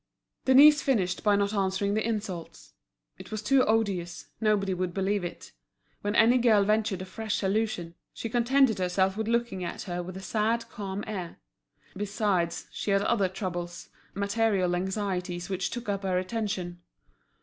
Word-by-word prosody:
Denise 285 +3 +8
finished 200 -10 0
by 205 -1 +4
not 200 +1 +1
answering 195 0 0
the 215 +1 +1
insults. 205 -7 -5 0.5
It - - -10
was 215 0 -4
too 270 +3 +4
odious, 195 -6 0
nobody 205 -3 +2
would 180 -1 -3
believe 195 0 0
it. 175 - -7 0.5
When 205 +1 -2
any 240 +3 +5
girl 220 -4 +5
ventured 210 -2 +1
a - - -7
fresh 215 +3 -3
allusion, 195 -4 -1 0.2
she - - -5
contented 240 0 +3
herself 190 +1 +1
with 220 0 -3
looking 235 -5 0
at 175 - -5
her 180 -2 -3
with 185 +1 -7
a - - -7
sad, 225 +3 0
calm 200 -2 -5
air. 190 -6 -5 0.6
Besides, 200 -4 -1
she - - -4
had 195 0 +3
other 205 -5 +2
troubles, 175 -2 -5 0.3
material 200 -3 +1
anxieties 185 -1 -3
which 190 -1 -1
took 240 -1 -6
up 200 -1 -1
her 190 -2 0
attention. 185 -3 -3
200 Hz, 160 wpm, -28 LUFS, 185-220 Hz, 0.6 s, Denise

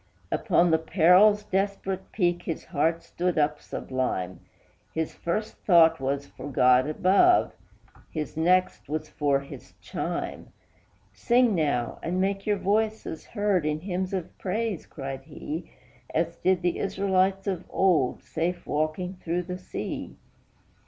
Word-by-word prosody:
Upon 175 0 +3
the 160 - +4
peril's 185 +6 +5
desperate 195 -1 -2
peak 175 -3 +1
his 165 - -5
heart 165 +1 0
stood 180 -1 -2
up 150 0 +1
sublime; 125 -9 -3 0.6
His 160 -1 -1
first 210 +6 -3
thought 165 -4 +5
was 140 +1 -1
for 145 - -9
God 125 +1 +4
above, 195 - +4 0.6
his 155 -3 -5
next 180 +2 +2
was 155 0 -3
for 140 -2 +1
his 140 - -11
chime; - - -4 0.6
"Sing 240 - +3
now 145 -8 0
and 180 +2 -2
make 195 +2 -1
your 205 -1 +2
voices 215 -3 -1
heard 205 -5 +1
in 155 0 -1
hymns 185 0 -2
of 185 -4 -4
praise," 210 -1 -2
cried 135 -2 -6
he, 160 +2 -6 0.5
"As 165 +1 0
did 185 -1 +1
the 175 - 0
Israelites 195 0 +1
of 185 -3 -2
old, 170 -9 +2
safe 175 +2 -3
walking 155 +5 -2
through 175 +2 -1
the 180 +1 -6
sea! 185 - -6
175 Hz, 135 wpm, -27 LUFS, 155-190 Hz, 0.6 s, peril's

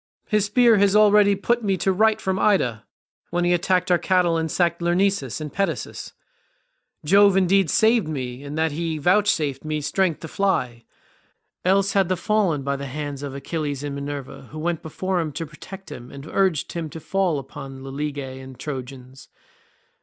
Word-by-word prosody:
His 210 -2 +1
spear 230 +1 +4
has 200 0 +3
already 210 -1 +6
put 235 +5 0
me 195 -2 +1
to 190 +1 +1
flight 220 +2 +3
from 190 0 -1
Ida, 125 - +1 0.4
when 175 +1 0
he 175 0 +3
attacked 180 +1 +1
our 175 - +4
cattle 180 -3 +2
and 160 0 -1
sacked 170 +1 0
Lyrnessus 175 - +1
and 150 -2 -6
Pedasus; 185 -8 -3 0.9
Jove 200 +3 +5
indeed 190 -2 +3
saved 220 - +3
me 130 -4 -4
in 145 +1 -6
that 160 0 +1
he 165 +1 -2
vouchsafed 160 -5 +1
me 155 0 -2
strength 170 +3 0
to 165 - -6
fly, 125 - -1 0.8
else 195 +2 +2
had 195 -3 +2
I - - +3
fallen 185 -7 0
by 140 0 -1
the 140 0 -6
hands 145 0 -5
of 140 -2 -6
Achilles 145 -1 -4
and 145 -1 -4
Minerva, 140 -2 -6
who 155 - -9
went 165 +1 -2
before 185 +4 -2
him 160 -3 -2
to 165 +3 -4
protect 165 +3 -11
him 125 -3 -9
and 140 0 -10
urged 185 -3 0
him 165 -2 -4
to 160 - -8
fall 185 -1 0
upon 135 0 -8
the 135 - -7
Lelegae 140 -2 -4
and 130 -1 -12
Trojans. 130 -2 -8
165 Hz, 180 wpm, -23 LUFS, 140-195 Hz, 0.9 s, already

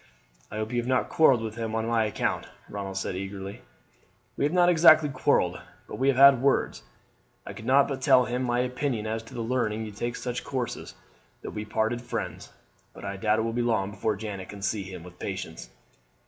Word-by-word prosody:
"I - - -8
hope 110 0 -3
you 120 - 0
have 120 - -3
not 130 0 +1
quarrelled 135 -7 +4
with 110 0 -5
him 110 -1 -3
on 110 0 -1
my 115 -1 +2
account!" 105 - -2 0.2
Ronald 100 -1 -5
said 95 - -2
eagerly. 95 +1 -6 0.7
"We - - 0
have 150 - +1
not 175 0 +4
exactly 160 -3 +6
quarrelled, 130 -1 +1 0.3
but - - -7
we 135 - +1
have 135 -2 +3
had 135 -2 +8
words. 135 - +1 0.6
I - - -7
could 110 - -10
not 135 +2 +5
but 135 -2 -4
tell 130 -1 +5
him 125 +1 -2
my 120 -1 +1
opinion 125 -3 -2
as 110 +1 -2
to 115 - -13
his 115 - -3
learning 110 -3 0
you 105 - -7
to - - -16
take 120 0 -2
such 125 0 -4
courses, 130 -3 -4 0.5
but - - -6
we 105 - -4
parted 110 +2 -1
friends; 120 - -5 0.4
but - - -9
I 100 - -4
doubt 105 +2 +1
it - - +1
will 115 0 -2
be 120 - 0
long 110 -5 0
before 105 +1 -1
Janet 100 -2 -6
can 100 -1 -9
see 105 +1 0
him 90 -2 -8
with 90 0 -13
patience." 80 -11 -6
115 Hz, 215 wpm, -27 LUFS, 105-130 Hz, 0.7 s, had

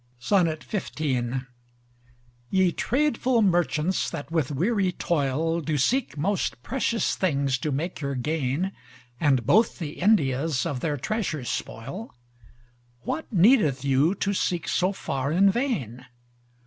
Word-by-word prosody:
XV 170 +1 +2 1.9
Ye 190 -2 +3
tradefull 255 - +1
Merchants, 175 -2 +1
that 145 - -7
with 160 -6 0
weary 185 - +1
toil, 165 +1 0
Do 155 -1 -1
seek 235 - +1
most 165 - -1
precious 235 -5 0
things 140 -7 0
to 150 +3 -2
make 160 +7 -3
your 140 -1 -2
gain; 150 +6 -1 0.5
And 135 -6 +2
both 215 - +3
the 155 -5 -6
Indias 150 - +2
of 135 - -2
their 150 +1 -1
treasures 155 - -2
spoil, 140 - -6 0.9
What 320 - -4
needeth 175 - +4
you 140 +7 +3
to 200 +1 -1
seek 175 -3 -1
so 185 +2 +1
far 140 -7 -3
in 195 +4 +5
vain? 140 - -2
165 Hz, 120 wpm, -25 LUFS, 140-200 Hz, 1.9 s, in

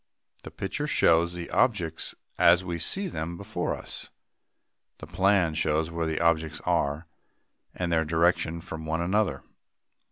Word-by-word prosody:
"] - - -23
The - - -6
picture 100 +10 -4
shows 85 - +3
the 90 -1 -7
objects 90 -10 0 0.2
as 85 +2 +5
we 85 -1 -3
see 195 - +1
them 85 - -5
before 100 -2 -3
us. - - -5 0.9
The - - -9
plan 95 -4 +2
shows 80 +1 0
where 85 -1 -2
the 80 - -1
objects 80 -2 +1
are, 75 +4 0 0.7
and 85 -1 -2
their 80 -1 +3
direction 85 +1 +1
from 80 -1 -7
one 80 +1 -1
another. 90 -5 0
85 Hz, 150 wpm, -27 LUFS, 80-90 Hz, 0.9 s, as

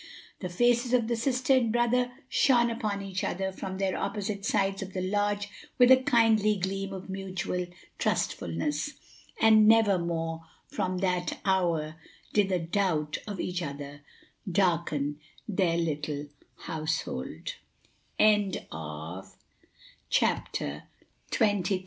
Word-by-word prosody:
The 180 - -4
faces 240 +6 +2
of 235 -3 +2
the 235 - +1
sister 255 +2 +1
and 245 -4 +3
brother 240 +1 +2 0.2
shone 240 -3 +4
upon 210 -3 -2
each 190 -1 -3
other 190 +1 -1
from 190 0 -6
their 190 -1 0
opposite 200 -1 -3
sides 195 -2 +1
of 190 -1 -6
the 185 - -2
lodge 205 +1 0 0.3
with 250 0 +7
a 260 - +10
kindly 225 -5 +4
gleam 195 +1 -3
of 190 -1 -7
mutual 185 -2 -3 0.3
trustfulness; 150 - -1 0.5
and 220 -1 +6
never 220 -4 +5
more 165 -1 -2 0.2
from 185 0 -2
that 180 -2 0
hour 170 -5 +1 0.4
did 200 -2 +3
a 185 - +3
doubt 165 -3 0
of 205 -3 -5
each 180 0 -2
other 145 -1 -6 0.6
darken 155 -6 +1 0.3
their 185 -5 +1
little 150 -3 -2 0.4
househol 155 - -3
195 Hz, 115 wpm, -29 LUFS, 170-215 Hz, 0.6 s, a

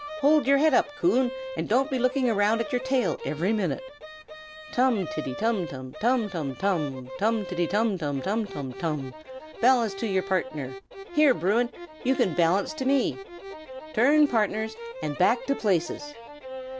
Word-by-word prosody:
Hold 295 0 +4
your 280 0 +5
head 310 +1 +3
up, 250 - +4
Coon, 265 -7 +3 0.3
and - - -4
don't 265 +6 +2
be 260 - 0
looking 255 +1 +1
round 215 0 +2
at 265 +6 -3
your 250 -2 0
tail 260 -4 0
every 175 +8 -1
minute. 215 +5 -1 0.9
Tum 240 -8 +2
tiddy 155 0 -4
tum 215 -4 0
tum, 130 -5 -8
tum 240 -1 +2
tum 160 -8 -4
tum! 150 -10 -1 0.4
tiddy 175 -1 -1
iddy - - -6
tum 205 0 +1
tum, 145 -3 -2
tum 210 +9 -1
tum 140 -10 -6
tum! 150 -7 -4 0.5
Balance 235 -4 +4
to 195 -1 -1
partners! 155 -8 -2 0.4
Here, 300 -5 +5
Bruin! 220 +8 +1 0.3
you 265 +1 +2
can 185 - +1
balance 180 - +2
to 290 -4 -5
me. 270 -1 +2 0.8
Turn 290 +7 +5
partners, 220 -2 0 0.3
and 145 -1 -2
back 240 +7 +3
to 275 - +1
places! 190 - 0
215 Hz, 160 wpm, -26 LUFS, 175-255 Hz, 0.9 s, your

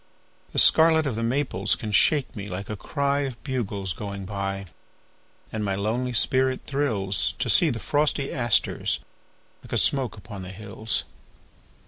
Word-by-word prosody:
The - - -7
scarlet 160 -1 +6
of 135 -6 -2
the 115 - -3
maples 115 -5 0
can 110 - -6
shake 140 +7 +3
me 105 -1 -6
like 95 +3 -6
a - - -3
cryOf 140 +3 -2
bugles 105 - -3
going 100 +1 -6
by. 100 0 -4 0.9
And 110 -1 -3
my 100 -1 -1
lonely 115 +5 -2
spirit 130 +2 +2
thrillsTo 105 -10 0
see 170 - +7
the 120 - -2
frosty 145 +3 0
asters 120 -5 +1 0.6
like - - -11
a - - +2
smoke 130 -7 +2
upon 100 -1 -9
the 90 - -8
hills. 105 +2 -3
110 Hz, 145 wpm, -25 LUFS, 100-135 Hz, 0.9 s, see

